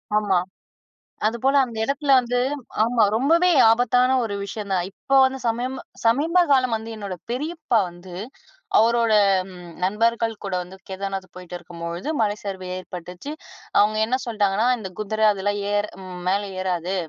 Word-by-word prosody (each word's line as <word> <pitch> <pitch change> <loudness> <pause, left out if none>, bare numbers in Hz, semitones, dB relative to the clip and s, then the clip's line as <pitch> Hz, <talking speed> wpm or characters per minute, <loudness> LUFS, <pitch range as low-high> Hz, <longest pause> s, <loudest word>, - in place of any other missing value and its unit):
ஆமா. 205 -3 +2 0.9
அதுபோல 235 +5 +1
அந்த 230 -2 -9
இடத்துல 280 +2 -1
வந்து 245 0 -1 0.5
ஆமா. 235 -1 +2
ரொம்பவே 335 +8 +3 0.2
ஆபத்தான 250 +2 +3
ஒரு 205 -2 -3
விஷயம் 200 0 -6
தான். 180 -2 +1
இப்ப 270 +7 +1
வந்து 265 0 0
சமயம் 250 +3 -2 0.3
சமீப 315 +10 +4
காலம் 255 -4 +3
வந்து 220 +1 -7
என்னோட 200 -3 -5 0.2
பெரியப்பா 300 -1 -1
வந்து, 175 +1 -12 0.6
அவரோட 230 0 +3 0.7
நண்பர்கள் 225 +3 +1
கூட 195 -2 -3
வந்து 180 +2 -12
கேதார்நாத் 195 0 -4
போயிட்டு 180 -1 -9
இருக்கும்பொழுது 170 - -6
மலை 210 -1 +1
சரிவு 190 -2 -5
ஏற்பட்டுச்சு. 180 - -8 0.5
அவுங்க 215 +1 +4
என்ன 255 +3 +1
சொல்ட்டாங்கன்னா, 210 -1 +1
"இந்த 195 - -6
குதிரை 215 +1 -1
அதெல்லாம் 205 +1 -2
ஏர் 205 0 +1
ம் 180 -1 -8
மேல 195 +2 +2 0.2
ஏறாது. 180 0 -2
215 Hz, 140 wpm, -23 LUFS, 190-245 Hz, 0.9 s, சமீப